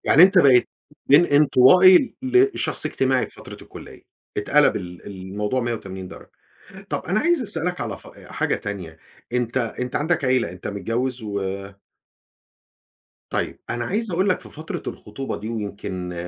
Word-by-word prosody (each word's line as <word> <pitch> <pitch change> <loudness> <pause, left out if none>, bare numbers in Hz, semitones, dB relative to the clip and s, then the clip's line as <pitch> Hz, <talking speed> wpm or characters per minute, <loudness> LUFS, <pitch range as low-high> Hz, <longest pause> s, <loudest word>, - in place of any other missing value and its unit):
يعني 155 - +7
أنت 190 +1 +7
بقيت 135 -7 +5 0.4
من 155 +5 +7
انطوائي 155 - +6
لشخص 375 +10 +1
اجتماعي - - +1
في - - -9
فترة - - -10
الكلية، - - -12 0.3
اتقلب 150 - +3
ال 90 -2 -8
الموضوع 100 +5 -3
180 95 -6 -5
درجة. - - -13 0.6
طب - - -3
أنا 190 +4 +1
عايز 340 +1 +2
أسأل 170 -8 -3
لك 180 0 -2
على 105 -4 -4
ف - - -11 0.2
حاجة - - -1
تانية 90 -6 -7 0.4
أنت 125 0 -1
أنت 125 +1 -3
عندك 160 0 0
عيلة 130 -8 +1
أنت 90 0 -8
متجوز 115 +6 -3
و 100 -1 -3 1.9
طيب، - - -3
أنا 120 0 -2
عايز 215 +1 -2
أقول 185 +4 +1
لك 185 - +1
في - - -10
فترة 155 +1 -6
الخطوبة 105 +6 -6
دي، 110 +2 -6
ويمكن 100 -5 -5
125 Hz, 150 wpm, -22 LUFS, -, 1.9 s, يعني